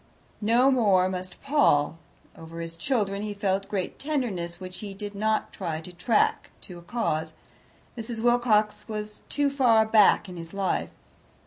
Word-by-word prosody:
No 240 +5 +4
more 200 -8 +4
must 185 0 -6
Paul. 165 - +3 0.4
Over 165 +1 -10
his 165 0 -5
children 200 0 -1
he 210 -1 -4
felt 195 -1 -1
great 190 -3 -3
tenderness, 215 - -2
which 185 -1 -8
he 200 -2 -7
did 205 0 -6
not 215 +2 -1
try 165 -5 -3
to 165 +3 -10
track 210 +6 +1
to 180 -2 -9
a - - -13
cause: 165 -6 -2 0.6
Mrs. 230 -1 -5
Wilcox 220 -3 +2
was 210 -1 -5
too 285 -1 +1
far 240 -5 +4
back 215 -2 +5
in 180 -1 -9
his 165 +2 -9
life. 195 -2 -1
205 Hz, 155 wpm, -26 LUFS, 180-225 Hz, 0.6 s, back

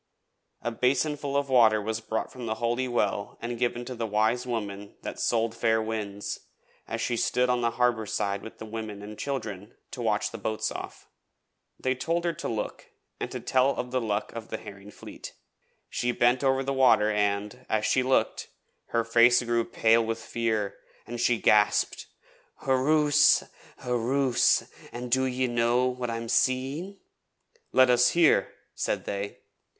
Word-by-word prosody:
A 120 - -1
basinful 140 +3 0
of 140 0 0
water 115 -5 +5
was 110 +2 -3
brought 110 0 -3
from 125 -2 -7
the 110 - -1
Holy 120 +3 -1
Well 105 -4 -1
and 120 0 -5
given 120 0 -1
to 130 - -5
the 115 -2 -3
Wise 110 +4 +1
Woman 100 -4 -4
that - - -6
sold 115 -1 +1
fair 115 -1 +2
winds, 105 -2 -4 0.5
as - - -4
she 120 - 0
stood 125 +2 +1
on 125 -1 +1
the 120 - +2
harbour 120 -3 +1
side 100 0 -1
with 110 - -10
the - - -8
women 110 -2 -6
and 105 +1 -8
children 105 -7 -5 0.2
to - - -6
watch - - 0
the - - -7
boats 110 0 -2
off. - - -8 0.7
They 130 - +1
told 165 +6 -1
her 170 - +1
to 165 - -5
look 110 -2 -4 0.3
and - - -3 0.2
tell 130 +1 +3
of 125 - -4
the 130 0 0
luck 105 -2 -2
of 115 -1 -7
the - - -4
Herring 100 0 -11
Fleet. - - -10 0.5
She 125 - -1
bent 120 +2 +2
over 135 0 +2
the 135 +1 -1
water 125 -5 +4
and, 105 +3 -1
as 110 -1 +1
she 130 - +3
looked, 130 +1 +1 0.4
her 115 -1 0
face 120 +2 +5
grew 120 -1 +1
pale 115 0 +3
with 115 0 -2
fear, 110 -3 -2 0.3
and 120 0 -5
she 120 -1 +3
gasped: 105 -1 +2 0.6
'Hurroose, 150 +3 +4 0.4
hurroose! 125 +1 +2 0.3
An' 125 +1 -6
do 130 +2 +2
ye 130 0 0
know 120 +1 +2
what 125 -1 -2
I'm 115 0 -4
seeing?' 135 - 0 0.7
'Let 130 -1 +5
us 125 0 +5
hear,' 170 -2 +3 0.2
said - - -2
they. 100 0 -4
120 Hz, 165 wpm, -27 LUFS, 110-130 Hz, 0.7 s, water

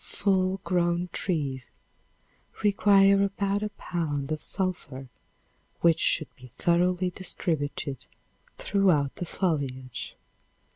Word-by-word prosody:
Full 190 -1 +1
grown 175 -1 0
trees 140 -8 -2 0.9
require 200 -1 +5
about 200 0 0
a 210 - -2
pound 155 -8 -3
of 155 - -2
sulphur 175 -9 -3 0.7
which 170 -2 +4
should 155 - +1
be 130 - -13
thoroughly 175 +7 +1
distributed 145 -7 -3 0.5
throughout 175 -9 +2
the 175 - -3
foliage. 135 - -3
175 Hz, 95 wpm, -27 LUFS, 145-195 Hz, 0.9 s, require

